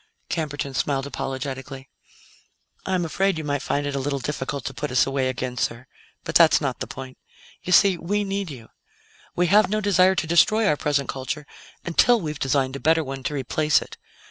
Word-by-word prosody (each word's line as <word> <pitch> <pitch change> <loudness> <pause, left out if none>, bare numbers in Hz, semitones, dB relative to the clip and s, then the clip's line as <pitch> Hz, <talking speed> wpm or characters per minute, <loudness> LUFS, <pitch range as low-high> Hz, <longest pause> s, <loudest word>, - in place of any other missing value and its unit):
Camberton 145 -4 -3
smiled 135 0 -1
apologetically. 135 -1 -5 1.0
"I'm 185 -2 0
afraid 190 +3 0
you 155 - -4
might 145 -2 -2
find 145 0 -1
it 145 - -3
a - - -1
little 140 +1 -2
difficult 135 0 -4
to - - -4
put 150 - -4
us 125 - +3
away 135 -1 0
again, 125 -1 -4
sir; 120 0 -2 0.4
but - - -5
that's - - +6
not - - -3
the - - -4
point. 130 -1 -9 0.4
You 180 - -5
see, 185 -1 +5
we 205 +4 -1
need 195 -2 -3
you. 125 -6 -10 0.7
We 175 - +2
have 200 +2 +4
no 215 +1 0
desire 190 -2 +4
to 175 - -1
destroy 195 +7 +4
our 175 - +3
present 145 -2 0
culture 135 +3 -4 0.4
until 230 +8 +4
we 160 -6 -3
have 150 - -9
designed 135 0 0
a - - -5
better 160 +2 +3
one 135 -1 -6
to 145 +3 -3
replace 145 +2 +2
it. - - -10
145 Hz, 195 wpm, -23 LUFS, 135-175 Hz, 1.0 s, that's